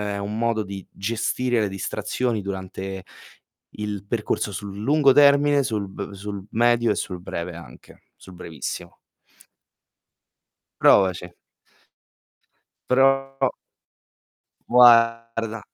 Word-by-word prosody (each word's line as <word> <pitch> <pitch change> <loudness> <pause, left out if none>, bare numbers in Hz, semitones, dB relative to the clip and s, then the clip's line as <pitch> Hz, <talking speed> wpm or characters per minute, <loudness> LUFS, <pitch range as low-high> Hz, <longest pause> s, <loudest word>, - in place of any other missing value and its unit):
è - - -3
un 105 +2 -4
modo 115 -2 0
di 95 -1 -8
gestire 115 +3 -1
le 105 - 0
distrazioni 110 +4 -3
durante 95 0 -6 0.7
il 105 -2 -5
percorso 105 -2 -2
sul 100 +1 -7
lungo 140 +5 +3
termine, 145 0 +5
sul 105 -5 -3
b 100 +1 -7
sul 100 0 -7
medio 120 0 +2
e - - 0
sul 90 -2 -5
breve 85 -1 -6
anche, 85 - -14
sul 95 - -15
brevissimo. 80 -4 -7 1.8
Provaci. 90 -2 +3 1.6
Pro 135 +1 +2 1.2
Guarda, 115 -2 +4
105 Hz, 100 wpm, -23 LUFS, 95-120 Hz, 1.8 s, termine